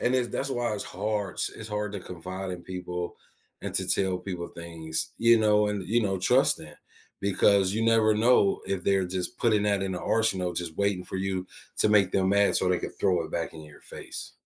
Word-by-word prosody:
and 125 Hz, -, +1 dB
it's, 125 Hz, -2 st, +1 dB
that's 140 Hz, +3 st, -3 dB
why 120 Hz, -3 st, -1 dB
it's 105 Hz, -, -4 dB
hard 105 Hz, 0 st, -3 dB
to -, -, -1 dB
it's 110 Hz, -, -7 dB
hard 105 Hz, -1 st, -3 dB
to 100 Hz, -, -5 dB
confide 90 Hz, +2 st, -6 dB
in 90 Hz, -1 st, -6 dB
people 90 Hz, -1 st, -5 dB, 0.5 s
and -, -, -5 dB
to -, -, +2 dB
tell 95 Hz, -2 st, +1 dB
people 90 Hz, -2 st, -5 dB
things, 80 Hz, -2 st, -5 dB
you 115 Hz, 0 st, +6 dB
know, 105 Hz, -1 st, +4 dB
and, 100 Hz, -3 st, -3 dB
you 115 Hz, +3 st, +2 dB
know, 95 Hz, -2 st, 0 dB
trust 125 Hz, +9 st, +3 dB
in 75 Hz, -1 st, -11 dB, 0.5 s
because 100 Hz, -1 st, +3 dB
you 110 Hz, -, 0 dB
never 110 Hz, -1 st, +4 dB
know 110 Hz, -2 st, +4 dB
if 95 Hz, -3 st, -2 dB
they're 95 Hz, -1 st, +2 dB
just 95 Hz, +6 st, -3 dB
putting 110 Hz, -3 st, +3 dB
that 100 Hz, -1 st, +1 dB
in 95 Hz, -1 st, -2 dB
the 90 Hz, -, -4 dB
arsenal, 95 Hz, -6 st, +1 dB
just 85 Hz, -3 st, -5 dB
waiting 100 Hz, -2 st, 0 dB
for -, -, -5 dB
you 95 Hz, -1 st, -2 dB, 0.3 s
to -, -, +4 dB
make 100 Hz, -3 st, +4 dB
them 95 Hz, -1 st, +2 dB
mad 100 Hz, 0 st, +3 dB
so 95 Hz, -, +2 dB
they 90 Hz, -1 st, +2 dB
could -, -, -6 dB
throw 90 Hz, -3 st, +2 dB
it -, -, -9 dB
back 85 Hz, -1 st, -3 dB
in 80 Hz, -, -9 dB
your 75 Hz, -1 st, -14 dB
face. -, -, -8 dB
95 Hz, 225 wpm, -27 LUFS, 90-105 Hz, 0.5 s, you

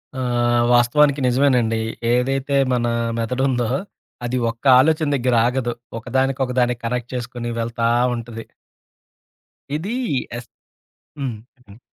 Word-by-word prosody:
ఆహ్, 120 Hz, -2 st, +1 dB
వాస్తవానికి 140 Hz, +4 st, +4 dB
నిజమేనండి. 125 Hz, -3 st, +2 dB, 0.3 s
ఏదైతే 135 Hz, +3 st, 0 dB, 0.2 s
మన 120 Hz, -1 st, +1 dB, 0.3 s
మెదడుందో, 125 Hz, +1 st, 0 dB, 0.6 s
అది 125 Hz, +1 st, -1 dB
ఒక్క 115 Hz, +3 st, -21 dB
ఆలోచన 155 Hz, +3 st, +2 dB
దగ్గర 125 Hz, -2 st, +1 dB
ఆగదు. 125 Hz, -1 st, -1 dB, 0.3 s
ఒకదానికి, 130 Hz, +3 st, -1 dB
ఒకదానికి 125 Hz, -1 st, 0 dB
కనెక్ట్ 125 Hz, 0 st, -3 dB
చేసుకొని 120 Hz, -1 st, -5 dB
వెళ్తా 115 Hz, 0 st, -1 dB, 0.3 s
ఉంటది. 115 Hz, -1 st, -7 dB, 1.3 s
ఇది 190 Hz, +9 st, -3 dB, 0.4 s
ఎస్, 120 Hz, -1 st, -10 dB, 0.7 s
హ్మ్. 130 Hz, -5 st, -3 dB, 0.3 s
హ్మ్. 100 Hz, +2 st, -15 dB
125 Hz, 105 wpm, -21 LUFS, 120-135 Hz, 1.3 s, వాస్తవానికి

